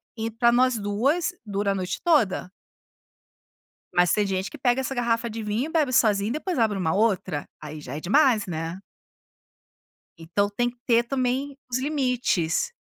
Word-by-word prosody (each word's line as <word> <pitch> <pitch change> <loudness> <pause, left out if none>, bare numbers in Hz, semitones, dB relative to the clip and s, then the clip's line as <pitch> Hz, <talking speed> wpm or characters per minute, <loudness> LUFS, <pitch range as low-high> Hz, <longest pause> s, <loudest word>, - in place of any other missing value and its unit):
i 225 0 -3
para 235 +2 +3
nós 250 -1 +3
2 270 - 0
dura 200 -1 -1
a - - -1
noite 185 -1 -3
toda. 270 - +2 1.5
Mas 175 -1 +4
tem 210 -1 +2
gente 190 0 -2
que 300 - -10
pega 255 0 +1
essa 270 0 -4
garrafa 235 -1 0
de 220 0 -5
vinho 215 +7 -1
e - - -9
bebe 295 -6 +1
sozinha, 210 -2 +3
e - - -2
depois 335 +2 -3
abre 220 -4 +2
uma 160 -1 0
outra. 190 -8 0 0.2
Aí 150 0 -7
já 135 -1 -7
é - - -4
demais, 225 - +3
né. 165 +2 -4 1.4
Então 180 +5 -1
tem 240 +4 0
que 245 - -17
ter 235 -1 +4
também 265 +2 -2
os 250 - 0
limites. 255 - 0
230 Hz, 175 wpm, -25 LUFS, 195-255 Hz, 1.5 s, Mas